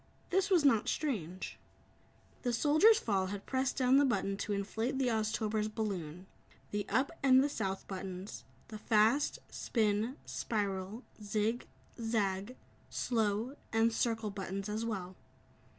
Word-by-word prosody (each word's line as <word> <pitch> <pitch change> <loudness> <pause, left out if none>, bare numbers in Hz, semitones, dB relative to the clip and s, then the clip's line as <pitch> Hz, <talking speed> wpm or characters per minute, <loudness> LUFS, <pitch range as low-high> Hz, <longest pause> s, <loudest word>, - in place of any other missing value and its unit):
This 385 +2 +2
was 350 -6 +4
not 230 -6 +4
strange. 190 - -3 0.8
The 245 -2 0
Soldier's 310 - +6
fall 195 - 0
had 200 +1 -6
pressed 265 0 0
down 260 0 +5
the 285 - +6
button 200 -6 +1
to 210 - -3
inflate 220 +6 -1
the 260 -2 +2
Oztober's 215 -1 0
balloon, 185 -6 -4 0.5
the 205 0 -2
"Up" 265 +2 +2
and 260 -1 +6
the - - +2
"South" 195 -9 -3
buttons, 190 0 -6 0.3
the 215 -1 -7
"fast," 225 +7 +3
"spin," 220 +3 0
"spiral," 205 +1 -3 0.2
"zig," 215 +3 -1 0.3
"zag," 210 0 -1 0.3
"slow" 225 +2 0 0.2
and 225 +1 +3
"circle" 225 -2 0
buttons 195 0 -4
as 215 +2 -2
well. 190 -5 -4
220 Hz, 135 wpm, -33 LUFS, 200-250 Hz, 0.8 s, Soldier's